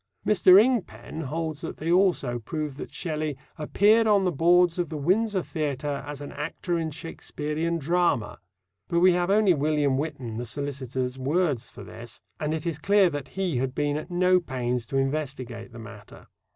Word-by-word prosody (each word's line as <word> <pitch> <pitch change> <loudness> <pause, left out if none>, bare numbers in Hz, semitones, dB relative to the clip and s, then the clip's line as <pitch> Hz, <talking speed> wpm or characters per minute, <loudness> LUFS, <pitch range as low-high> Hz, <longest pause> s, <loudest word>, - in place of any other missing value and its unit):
Mr. 190 -2 +7
Ingpen 220 - -1
holds 155 +1 -3
that - - -6
they 165 +2 -2
also 175 -10 +2
prove 150 +3 -4
that - - -7
Shelley 155 -4 -3 0.2
"appeared 210 +8 +4
on 205 -2 +4
the 180 - +1
boards 175 +3 +3
of 175 -3 -1
the 155 - -4
Windsor 190 +5 +1
Theatre 145 -3 -3
as 145 -1 -6
an 145 - -7
actor 170 +3 -3
in 160 -1 -2
Shakespearean 160 0 -4
drama." 165 -7 0 0.5
But 170 0 +1
we 185 +1 +7
have 175 +1 0
only 205 -2 +4
William 145 -2 +1
Whitton, 130 -7 -4
the 120 - -4
solicitor's 130 -1 -4
words 145 -2 0
for - - -11
this, - - -10 0.2
and 150 -1 -1
it 160 0 -3
is 165 -3 -2
clear 200 +1 +4
that 145 -3 -5
he 185 -8 0
had 130 +1 -2
been 145 0 0
at 155 - -5
no 180 +1 +3
pains 125 -6 -3
to 135 - -2
investigate 135 -4 -3
the 120 - -11
matter. 110 -2 -12
155 Hz, 180 wpm, -26 LUFS, 135-175 Hz, 0.5 s, Mr